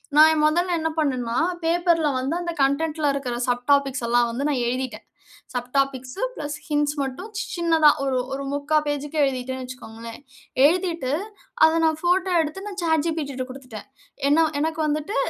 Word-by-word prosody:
நான் 310 Hz, +1 st, +8 dB
என் 305 Hz, -1 st, +2 dB
மொதல்ல 350 Hz, +3 st, +1 dB
என்ன 320 Hz, 0 st, 0 dB
பண்ணேன்னா, 255 Hz, -6 st, 0 dB, 0.3 s
பேப்பர்ல 335 Hz, -2 st, +2 dB
வந்து 270 Hz, +5 st, -1 dB
அந்த 345 Hz, -1 st, -3 dB
கன்டென்ட்ல 300 Hz, +2 st, +1 dB
இருக்கிற 265 Hz, -3 st, -3 dB
சப் 245 Hz, 0 st, -1 dB
டாபிக்ஸ் 275 Hz, -3 st, +1 dB
எல்லாம் 240 Hz, 0 st, +3 dB
வந்து 245 Hz, +4 st, -3 dB
நான் 270 Hz, -4 st, 0 dB
எழுதிட்டேன். 245 Hz, -3 st, -3 dB, 0.5 s
சப் 245 Hz, -1 st, -3 dB
டாபிக்ஸு, 270 Hz, +2 st, -1 dB
பிளஸ் 295 Hz, -1 st, -4 dB
ஹிண்ட்ஸ் 295 Hz, -1 st, +1 dB
மட்டும் 275 Hz, +10 st, -5 dB, 0.3 s
சின்னதா 325 Hz, -3 st, +4 dB
ஒரு 265 Hz, -2 st, 0 dB, 0.2 s
ஒரு 275 Hz, +1 st, -3 dB
3/4 290 Hz, +2 st, +1 dB
பேஜ்க்கு 290 Hz, +1 st, -3 dB
எழுதிட்டேன்னு 260 Hz, -1 st, -2 dB
வச்சிக்கோங்களேன். 230 Hz, -2 st, -9 dB, 0.5 s
எழுதிட்டு 335 Hz, -4 st, +1 dB, 0.5 s
அத 320 Hz, +1 st, +3 dB
நான் 315 Hz, -1 st, +2 dB
ஃபோட்டோ 365 Hz, +2 st, +2 dB
எடுத்து 320 Hz, +5 st, -5 dB
நான் 400 Hz, -2 st, -6 dB
சாட் 320 Hz, -3 st, +2 dB
ஜிபிடிட்ட 285 Hz, -6 st, -3 dB
குடுத்துட்டேன். 255 Hz, -4 st, -10 dB, 0.4 s
ஏன்னா 315 Hz, +3 st, +5 dB, 0.2 s
"எனக்கு 320 Hz, +1 st, -1 dB
வந்துட்டு, 305 Hz, +8 st, -2 dB
290 Hz, 155 wpm, -23 LUFS, 255-320 Hz, 0.5 s, நான்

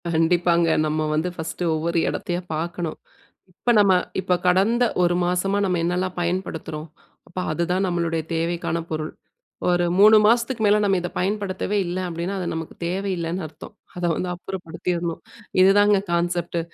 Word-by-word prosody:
கண்டிப்பாங்க, 170 Hz, +1 st, +3 dB, 0.2 s
நம்ம 155 Hz, 0 st, 0 dB
வந்து 160 Hz, +4 st, 0 dB
ஃபர்ஸ்ட்டு 165 Hz, +1 st, -5 dB
ஒவ்வொரு 165 Hz, +2 st, -1 dB
எடத்தையா 175 Hz, 0 st, -3 dB
பார்க்கணும், 165 Hz, 0 st, -3 dB, 0.5 s
இப்ப 220 Hz, +6 st, -1 dB
நம்ம 200 Hz, -2 st, +5 dB, 0.3 s
இப்ப 180 Hz, -1 st, +1 dB
கடந்த 200 Hz, +7 st, +3 dB, 0.2 s
1 175 Hz, 0 st, +2 dB
மாசமா 180 Hz, +3 st, 0 dB
நம்ம 180 Hz, -2 st, 0 dB
என்னலாம் 180 Hz, +1 st, -1 dB
பயன்படுத்துறோம்? 165 Hz, -3 st, -3 dB, 0.4 s
அப்ப 180 Hz, -, -6 dB
அதுதான் 180 Hz, +4 st, 0 dB
நம்மளுடைய 170 Hz, -2 st, -1 dB
தேவைக்கான 165 Hz, 0 st, -1 dB
பொருள். 155 Hz, 0 st, -3 dB, 0.6 s
ஒரு 175 Hz, 0 st, +2 dB
3 215 Hz, +2 st, +8 dB
மாசத்துக்கு 235 Hz, +2 st, +2 dB
மேல 205 Hz, +1 st, +5 dB
நம்ம 195 Hz, -2 st, +3 dB
இத 175 Hz, -, -3 dB
பயன்படுத்தவே 200 Hz, +1 st, -1 dB
இல்ல 175 Hz, +1 st, -3 dB
அப்படின்னா, 170 Hz, +3 st, -3 dB
அது 180 Hz, -, -3 dB
நமக்கு 160 Hz, 0 st, -6 dB
தேவை 190 Hz, +3 st, -2 dB
இல்லைன்னு 170 Hz, +2 st, -3 dB
அர்த்தம். 155 Hz, 0 st, -12 dB, 0.2 s
அத 175 Hz, -, -2 dB
வந்து 180 Hz, +2 st, -2 dB
அப்புறப்படுத்திரணும். 175 Hz, -1 st, -4 dB, 0.4 s
இதுதாங்க 205 Hz, +2 st, +5 dB
கான்செப்ட்டு! 170 Hz, 0 st, 0 dB
175 Hz, 145 wpm, -23 LUFS, 170-190 Hz, 0.6 s, 3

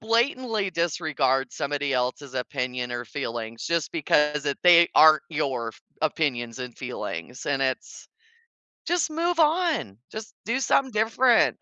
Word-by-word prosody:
blatantly 230 Hz, -2 st, 0 dB
disregard 150 Hz, -6 st, 0 dB
somebody 145 Hz, -1 st, -2 dB
else's 130 Hz, +2 st, -2 dB
opinion 125 Hz, -1 st, -3 dB
or 120 Hz, 0 st, -4 dB
feelings, 115 Hz, +1 st, -5 dB
just 170 Hz, -3 st, -1 dB
because 150 Hz, -2 st, +1 dB
it 140 Hz, -1 st, -1 dB
they 170 Hz, -1 st, +7 dB
aren't 155 Hz, -1 st, +7 dB
your 135 Hz, -7 st, -2 dB
f -, -, -12 dB, 0.2 s
opinions 130 Hz, -7 st, -1 dB
and 125 Hz, -2 st, -7 dB
feelings, 120 Hz, +11 st, -6 dB
and 135 Hz, -1 st, 0 dB
it's 130 Hz, -1 st, -3 dB, 0.8 s
just 345 Hz, -1 st, 0 dB
move 335 Hz, +2 st, -1 dB
on, 315 Hz, -, +1 dB
just 220 Hz, 0 st, -8 dB
do 240 Hz, +4 st, 0 dB
something 265 Hz, -1 st, +2 dB
different. 225 Hz, +3 st, +3 dB
150 Hz, 135 wpm, -25 LUFS, -, 0.8 s, they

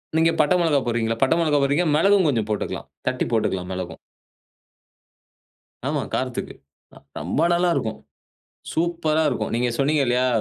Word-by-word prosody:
நீங்க 165 Hz, +1 st, +4 dB
பட்ட 150 Hz, +3 st, +3 dB
மிளகா 160 Hz, -4 st, +2 dB
போடுறீங்களா? 115 Hz, -1 st, -1 dB
பட்டை 135 Hz, +5 st, +3 dB
மிளகா 155 Hz, -3 st, +2 dB
போடுறீங்க, 145 Hz, +6 st, +2 dB
மிளகும் 195 Hz, +2 st, +4 dB
கொஞ்ச 125 Hz, -6 st, +2 dB
போட்டுக்கலாம். 105 Hz, -, -3 dB, 0.2 s
தட்டி 130 Hz, 0 st, 0 dB
போட்டுக்கலாம் 95 Hz, -5 st, 0 dB
மிளகும். 90 Hz, -1 st, -6 dB, 1.9 s
ஆமா -, -, 0 dB
காரத்துக்கு. -, -, -3 dB, 0.4 s
அ -, -, -13 dB, 0.2 s
ரொம்ப 90 Hz, -, -1 dB
நல்லா 175 Hz, +1 st, +2 dB
இருக்கும். 110 Hz, -1 st, -2 dB, 0.7 s
சூப்பர்ரா 160 Hz, -2 st, +1 dB
இருக்கும். -, -, -3 dB
நீங்க 120 Hz, +1 st, +1 dB
சொன்னீங்க 145 Hz, +1 st, +2 dB
இல்லையா? 125 Hz, +1 st, +2 dB
145 Hz, 140 wpm, -23 LUFS, 115-165 Hz, 1.9 s, நீங்க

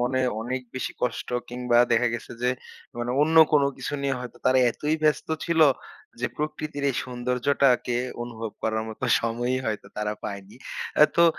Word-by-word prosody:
মনে 130 Hz, +2 st, +1 dB, 0.2 s
অনেক 130 Hz, +3 st, -3 dB
বেশি 130 Hz, -, -3 dB
কষ্ট। 125 Hz, -2 st, -1 dB, 0.2 s
কিংবা 125 Hz, -1 st, +1 dB
দেখা 120 Hz, +1 st, +4 dB
গেছে 120 Hz, -, -6 dB
যে 125 Hz, -, +3 dB, 0.5 s
মানে 120 Hz, +1 st, -2 dB
অন্য 160 Hz, +2 st, +2 dB, 0.2 s
কোনো 145 Hz, -2 st, +5 dB
কিছু 135 Hz, +2 st, -4 dB
নিয়ে 135 Hz, -1 st, +1 dB
হয়তো 125 Hz, -1 st, -8 dB
তারা 130 Hz, 0 st, +5 dB
এতই 150 Hz, +6 st, -1 dB
ব্যস্ত 150 Hz, -1 st, +2 dB, 0.2 s
ছিল। 170 Hz, -1 st, +1 dB, 0.6 s
যে -, -, +1 dB
প্রকৃতির 150 Hz, -1 st, -3 dB
এই -, -, -5 dB
সৌন্দর্যটাকে 125 Hz, 0 st, +1 dB, 0.3 s
অনুভব 115 Hz, -2 st, -5 dB
করার 110 Hz, 0 st, 0 dB
মতো 110 Hz, +3 st, -5 dB, 0.2 s
সময়ই 120 Hz, +3 st, -1 dB
হয়তো 110 Hz, -1 st, -3 dB
তারা 105 Hz, 0 st, -1 dB
পায়নি। 100 Hz, +1 st, -7 dB, 0.4 s
অ্যা -, -, +9 dB
তো, 170 Hz, -, +7 dB
125 Hz, 165 wpm, -26 LUFS, 120-140 Hz, 0.6 s, অ্যা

